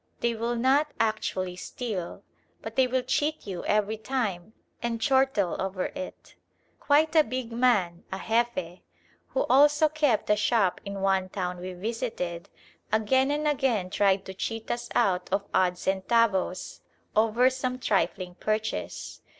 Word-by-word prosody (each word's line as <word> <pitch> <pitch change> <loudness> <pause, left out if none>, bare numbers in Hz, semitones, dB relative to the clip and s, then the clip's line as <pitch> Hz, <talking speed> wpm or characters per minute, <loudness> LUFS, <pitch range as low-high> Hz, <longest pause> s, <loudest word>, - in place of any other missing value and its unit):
They 235 0 +1
will 230 +2 -2
not 275 +5 +2
actually 190 -5 -1
steal, 200 -4 -5 0.4
but - - -7
they 260 -1 +4
will 255 0 0
cheat 300 +4 -1
you 185 -4 -5
every 210 +1 +1
time 220 -5 -3 0.3
and 235 -1 -2
chortle 265 -7 +2
over 190 -1 -2
it. 280 -1 -8 0.5
Quite 310 +3 +3
a 310 - +7
big 255 -4 -4
man, 210 -8 +2
a 190 - -3
Jefe, 225 -7 0 0.5
who - - -1
also 295 +3 +5
kept 295 -9 +1
a - - +6
shop 210 -3 +1
in 200 -1 -5
one 190 -1 +1
town 180 -2 -3
we 185 +1 -6
visited, 180 -4 -4 0.4
again 260 +5 +3
and 300 +1 0
again 260 -10 +1
tried 195 -1 +2
to 190 - -7
cheat 225 +3 -4
us 240 - -3
out 180 -2 +2
of 200 +1 0
odd 185 -1 +3
centavos 190 0 0 0.4
over 225 +4 +4
some 255 -1 -2
trifling 185 -5 0
purchase. 215 0 -3
220 Hz, 145 wpm, -27 LUFS, 190-255 Hz, 0.5 s, a